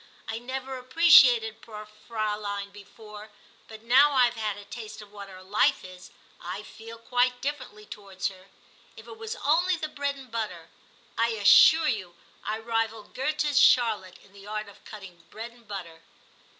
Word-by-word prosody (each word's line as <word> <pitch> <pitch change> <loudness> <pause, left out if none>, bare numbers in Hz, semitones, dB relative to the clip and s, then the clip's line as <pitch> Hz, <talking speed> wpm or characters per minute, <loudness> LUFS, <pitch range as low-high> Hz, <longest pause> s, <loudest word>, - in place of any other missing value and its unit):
I 225 0 -4
never 260 +1 -6
appreciated 250 -6 +5
poor 215 -2 -10
Fraulein 210 -2 -5
before; 210 +1 -13 0.4
but 220 0 -12
now 270 +5 +5
I 255 -2 +5
have 240 - -1
had 215 -3 -3
a 205 - -11
taste 215 0 -9
of 210 -1 -13
what 200 -1 -10
her 185 -1 -12
life 200 +3 +1
is, 185 -1 -13 0.3
I 185 +4 -7
feel 225 +2 -12
quite 245 +1 0
differently 270 -7 -6
towards 195 -2 -6
her; 190 -1 -16 0.5
if - - -12
it 445 - -12
was 450 +1 -5
only 350 +5 +3
the 315 -2 -4
bread 285 -1 -3
and 265 -3 -14
butter. 185 -8 -5 0.5
I 230 - +3
assure 220 +10 +6
you, 190 -9 -3 0.3
I 215 +1 -3
rival 225 -1 -2
Goethe's 295 +2 -1
Charlotte 215 -7 +3
in 200 - -22
the 200 0 -14
art 215 0 -5
of 200 - -17
cutting 190 -5 -12
bread 230 +2 -8
and 235 -2 -23
butter.' 175 -6 -8
220 Hz, 170 wpm, -26 LUFS, 205-250 Hz, 0.5 s, assure